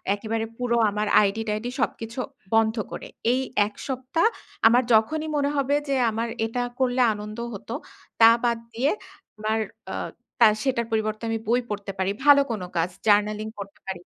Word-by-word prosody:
একেবারে 225 +2 -3
পুরো 245 -1 0
আমার 210 +1 -2
আইডি-টাইডি 215 +2 -1
সবকিছু 225 +3 -3 0.4
বন্ধ 220 0 +3 0.2
করে। - - -6 0.3
এই 260 - +1 0.3
১ 210 - -12
সপ্তাহ 265 - 0 0.4
আমার 245 +3 +5
যখনই 305 +9 +2
মনে 285 0 +1
হবে 280 +1 +2
যে 275 - +2 0.2
আমার 230 +2 -2 0.2
এটা 230 +2 -2 0.2
করলে 255 -1 +2
আনন্দ 210 +1 -7 0.2
হত 200 - -10 0.5
তা 225 - +10
বাদ 235 -1 +2 0.2
দিয়ে 255 +6 +1 0.5
আমার 215 +1 0 0.3
আ - - -3 0.4
তার 220 -3 +7
সেটার 255 -4 0
পরিবর্তে 215 0 -1
আমি 225 - 0
বই 240 +3 +3
পড়তে 205 -1 -4
পারি, 190 +1 +1
ভালো 285 -1 +8
কোন 215 -4 -3 0.2
কাজ, 165 +2 +1 0.2
জার্নালিং 210 +1 +3
পড়তে 200 0 -9
পারি। 190 -2 -4
225 Hz, 160 wpm, -25 LUFS, 210-250 Hz, 0.5 s, তা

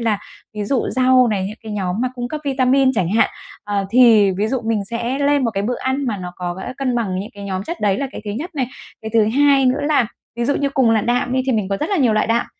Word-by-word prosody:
là, 220 -3 0 0.4
ví 210 - -3
dụ, 250 +4 0
rau 255 -1 +4
này, 200 -4 -1
những 215 +3 -7
cái 220 -1 -7
nhóm 185 -3 -2
mà 255 - +1
cung 245 -1 -4
cấp 305 +4 -5
vitamin 265 -1 +3
chẳng 185 -8 0
hạn, 220 +5 +3 0.4
ờ, 205 -1 -1
thì, 225 -4 +6
ví 200 +3 -1
dụ, 260 -1 -1
mình 220 -3 0
sẽ 235 +5 -3
lên 285 -1 +2
một 230 - +1
cái 195 -2 -2
bữa 245 +3 -1
ăn 265 +1 -1
mà 215 -4 -1
nó 180 -1 -7
có, 175 0 -4
ơ, 255 - -5
cân 265 -3 0
bằng 195 -6 -1
những 205 - -7
cái 200 0 -9
nhóm 190 -1 -3
chất 340 +9 -6
đấy 200 -1 +1
là 275 - -1
cái - - -7
thứ 205 - -4
nhất 310 - -5
này. 260 -4 -1 0.4
Cái 220 - -5
thứ 220 -2 +5
hai 280 -2 +5
nữa 255 - +2
là, 290 -5 +2 0.3
ví 235 - -1
dụ 285 - +1
như, 280 - 0
cùng 265 -4 +2
là 225 -1 +3
đạm 245 +3 0
đi 260 0 +1
thì 265 - +2
mình 210 -4 0
có 195 - -1
rất 310 - -2
là 400 - +1
nhiều 255 -9 +3
loại 215 - +1
đạm, 230 +1 +1
235 Hz, 290 wpm, -19 LUFS, 205-265 Hz, 0.4 s, thì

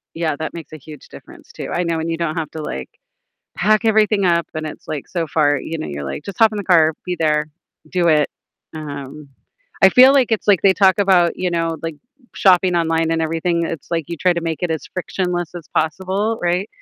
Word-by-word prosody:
Yeah, 160 -3 -1
that 160 - -5
makes 165 -2 -9
a - - -7
huge 150 0 -13
difference, - - -14
too. - - -7
I 180 - 0
know 170 -1 -1
when 160 +1 -3
you 165 - -2
don't 165 -2 -2
have 155 -2 -3
to, 160 - -6
like, 65 - -5 0.7
pack, 215 +4 +2
everything 215 -2 +3
up, 170 -1 +2
and 155 0 -4
it's, 150 - -9
like, 150 -3 -5
so 170 -3 -2
far, 145 -1 +2
you 165 +4 -5
know, - - -4
you're 70 -1 -6
like, 70 0 -6
"Just 200 - -8
hop 225 -1 +5
in 210 - -4
the 205 - -4
car, 160 -4 +4
be 180 -1 -3
there, 150 -1 +1 0.4
do 175 0 +1
it," 150 -2 +3 0.5
um, 145 -1 -8 0.5
I 190 - +9
feel 260 +4 +7
like 260 -5 +3
it's 215 - -1
like, 195 -4 +5
they 195 - +6
talk 190 0 +4
about, 185 -4 +3
you 180 -1 -1
know, 165 -1 -1
like, 165 -1 -4 0.4
shopping 185 -1 +4
online 165 -1 +1
and 165 - 0
everything, 165 +1 0
it's, 165 -2 -6
like, 165 -3 -1
you 170 - -4
try 180 +3 +2
to 170 - -3
make 165 0 -4
it 175 - -2
as 160 - -4
frictionless 180 -2 -3
as 170 -3 -9
possible, 190 +7 -1
right? 175 +4 0
170 Hz, 230 wpm, -19 LUFS, 155-185 Hz, 0.7 s, I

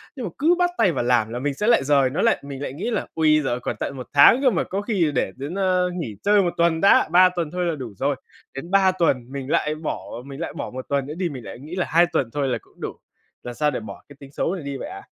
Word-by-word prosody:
Nhưng 255 -4 -5
mà - - -3
cứ 325 +5 +3
bắt 355 0 +3
tay 185 - +4
vào 140 - -2
làm 120 -3 +2
là 120 +2 -4
mình 145 +2 -1
sẽ 210 +10 -2
lại 235 - +4
dời 140 -2 +3
nó 155 +8 -2
lại, 230 - +3
mình 140 -1 -7
lại 140 - -4
nghĩ 170 - -4
là: 215 - -2
"Ôi, 155 -1 +3
giời 125 -2 -1
còn - - -4
tận 135 - -4
1 125 - -7
tháng 145 - +7
cơ 270 - +5
mà, 205 - 0
có 195 +2 -3
khi 195 -8 0
để - - 0
đến, 140 +7 -6
ơ, 185 -2 +1
nghỉ 160 - -5
chơi 205 0 +4
1 175 -2 -1
tuần 170 -1 +2
đã, 195 - +5
3 180 +1 +7
tuần 170 -4 -4
thôi 180 0 -2
là 170 -2 0
đủ 125 -7 -7
rồi." 140 +4 0 0.4
Đến 165 +6 -8
3 195 -1 +5
tuần 135 -9 0
mình 135 -1 -6
lại 150 0 +1
bỏ, 155 0 -4 0.2
mình 140 0 -9
lại 170 - -4
bỏ - - -5
1 130 0 -7
tuần 140 -1 0
nữa 145 - -6
đi 180 -2 -1
mình 130 -5 -8
lại - - -9
nghĩ 155 +6 -8
là 185 - 0
2 170 +2 +5
tuần 130 - 0
thôi 145 -2 0
là 125 - 0
cũng - - -24
đủ. - - -4 0.5
Làm 120 - -6
sao 150 +2 +1
để 130 - -3
bỏ 110 - -10
cái 145 - -13
tính 140 -1 -13
xấu 170 +5 -1
này 175 - -7
đi 140 -1 -5
vậy - - -6
ạ? - - -9
155 Hz, 300 wpm, -23 LUFS, 135-185 Hz, 0.5 s, tháng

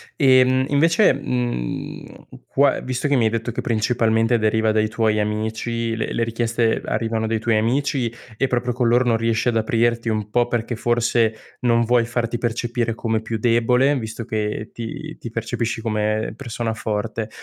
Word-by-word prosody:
Ehm, 130 -2 +4
invece, 165 +8 +4
mhmm, 120 - -4 0.2
qua 140 0 +2
visto 130 +3 -2
che 140 - +3
mi 115 - +3
hai 110 - +4
detto 115 +1 -2
che - - -6
principalmente 115 0 +1
deriva 110 0 +2
dai 110 0 +2
tuoi 110 -1 +1
amici, 110 +2 -2
le - - -3
le 115 - 0
richieste 115 0 0
arrivano 110 0 -1
dai 110 0 0
tuoi 115 -1 +2
amici 125 +2 0 0.3
e 135 - +1
proprio 125 -1 0
con 120 0 0
loro 120 +2 +4
non 115 -2 +2
riesci 115 +1 +1
ad 115 - 0
aprirti 115 +1 +1
un 105 -2 -1
po' 120 +1 +2
perché 120 -1 -2
forse 120 -2 0
non 115 -1 +3
vuoi 120 0 +3
farti 120 0 -2
percepire 120 0 -2
come 115 -1 -1
più 115 0 -3
debole 125 +4 +3
visto 110 0 -6
che 110 0 -3
ti 155 +7 -7
ti 115 - -6
percepisci 115 0 -3
come 110 -1 -1
persona 115 -1 -3
forte. 110 0 -3
115 Hz, 170 wpm, -21 LUFS, 110-120 Hz, 0.3 s, Ehm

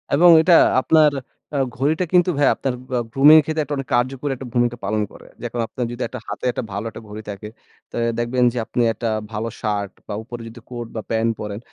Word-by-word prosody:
এবং 175 +4 +6
এটা 170 +2 +4 0.3
আপনার 155 +1 +5 0.4
আ - - +1 0.2
ঘড়িটা 155 +7 +1
কিন্তু 180 0 +5
ভাই 145 - +4
আপনার 135 - -2 0.4
গ্রুমিং 145 +3 +8
এর - - +1
ক্ষেত্রে 155 0 -1 0.3
কার্যকরী 130 +3 0 0.2
ভূমিকা 120 0 +1
পালন 105 +2 0
করে। - - -14 0.2
যে - - -6 0.2
আপনার 125 - -4
যদি 120 +1 -4 0.3
হাতে - - -6
একটা 125 - -4
ভালো 100 +3 -4
একটা 110 - -10
ঘড়ি 105 +1 -7
থাকে 100 +1 -7 0.4
তা - - -9 0.2
দেখবেন 120 +1 +1
যে - - -6
আপনি 120 - -1
একটা 115 0 -3 0.2
ভালো 110 +1 -3
শার্ট 105 -3 -2 0.2
বা - - -4
উপরে 120 0 -8
যদি 115 +1 -11
কোট 120 -2 -6
বা 110 - -2
প্যান্ট 115 0 +2
পরেন, 105 -1 -5
120 Hz, 195 wpm, -21 LUFS, 110-145 Hz, 0.4 s, গ্রুমিং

